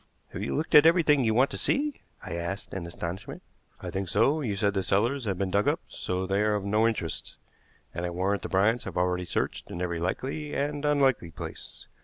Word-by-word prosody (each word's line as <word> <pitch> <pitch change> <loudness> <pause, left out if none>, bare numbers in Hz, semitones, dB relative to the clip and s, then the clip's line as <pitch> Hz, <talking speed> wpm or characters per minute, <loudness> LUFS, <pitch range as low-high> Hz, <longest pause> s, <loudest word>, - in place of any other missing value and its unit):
"Have 95 - -5
you 105 - -2
looked 155 +3 -2
at 150 +1 +9
everything 160 -5 +4
you 110 -2 +2
want 130 +3 +4
to - - -4
see?" 290 0 0 0.2
I - - -6
asked 85 +4 -4
in 90 -3 -4
astonishment. 85 +2 -6 0.4
"I - - -5
think 95 -1 -3
so. 135 - +3
You 110 -8 -1
said 100 0 +1
the 95 - 0
cellars 120 +8 +1
had 95 -3 -1
been 95 0 -1
dug 100 +1 +2
up, - - +2
so 90 +1 -3
they 100 +2 +1
are 105 0 +2
of 100 -1 -2
no 105 +3 +3
interest, 90 -8 -3 0.6
and 85 - -4
I 90 - -1
warrant 95 +3 0
the - - -5
Bryants 105 +5 +2
have - - -6
already 90 0 +1
searched - - -2
in 85 - -6
every 85 -2 -2
likely 135 - -3
and 145 +1 -1
unlikely 135 - +2
place. 80 - -9
100 Hz, 220 wpm, -28 LUFS, 90-135 Hz, 0.6 s, at